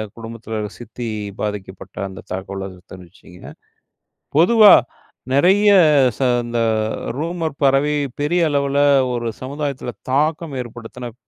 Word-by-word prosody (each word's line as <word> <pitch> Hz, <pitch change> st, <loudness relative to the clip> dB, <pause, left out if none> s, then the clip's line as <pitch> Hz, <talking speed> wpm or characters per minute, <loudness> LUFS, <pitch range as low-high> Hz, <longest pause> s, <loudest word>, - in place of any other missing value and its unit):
குடும்பத்தில 115 Hz, -1 st, -7 dB, 0.2 s
சித்தி 120 Hz, +1 st, -7 dB, 0.3 s
பாதிக்கப்பட்ட 100 Hz, -3 st, -6 dB
அந்த 95 Hz, -1 st, -10 dB
தகவலை 95 Hz, +1 st, -5 dB, 0.3 s
தெரிவிச்சீங்க. 90 Hz, 0 st, -15 dB, 1.0 s
பொதுவா 210 Hz, +5 st, +7 dB, 0.6 s
நெறைய 195 Hz, +9 st, +4 dB, 0.5 s
ச -, -, -23 dB, 0.3 s
இந்த 120 Hz, 0 st, -2 dB, 0.6 s
ரூமர் 165 Hz, -2 st, -3 dB
பறவை 140 Hz, +2 st, +3 dB, 0.3 s
பெரிய 170 Hz, +4 st, +1 dB
அளவில 140 Hz, -1 st, 0 dB, 0.4 s
ஒரு 120 Hz, -1 st, -2 dB
சமுதாயத்தில 140 Hz, -2 st, -4 dB, 0.2 s
தாக்கம் 155 Hz, +1 st, 0 dB
ஏற்படுத்தின 120 Hz, 0 st, -9 dB
130 Hz, 95 wpm, -19 LUFS, 115-150 Hz, 1.0 s, பொதுவா